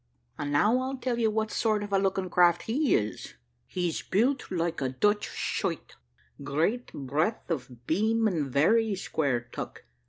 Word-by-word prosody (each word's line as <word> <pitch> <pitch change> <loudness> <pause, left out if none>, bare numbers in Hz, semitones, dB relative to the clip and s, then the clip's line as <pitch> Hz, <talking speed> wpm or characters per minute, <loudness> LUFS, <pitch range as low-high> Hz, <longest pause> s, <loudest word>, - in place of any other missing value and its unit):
And 145 0 -2
now 210 - +4
I'll 265 +1 -3
tell 250 -2 -2
you 225 -2 +3
what 220 0 -1
sort 215 -2 +1
of 205 -1 -6
a 195 - +4
looking 190 -1 0
craft 175 -1 +4
he 270 +5 +2
is. 105 0 -3 0.3
He's 175 -3 -2
built 250 +7 +1
like 170 -3 -1
a 130 - 0
Dutch 205 +11 +1
schuyt, - - -3 0.5
great 165 - 0
breadth 155 - -2
of 125 -5 -5
beam, 220 +6 +2
and 155 -9 -1
very 215 - +3
square 140 -9 -1
tuck. - - -7
190 Hz, 160 wpm, -28 LUFS, 150-220 Hz, 0.5 s, now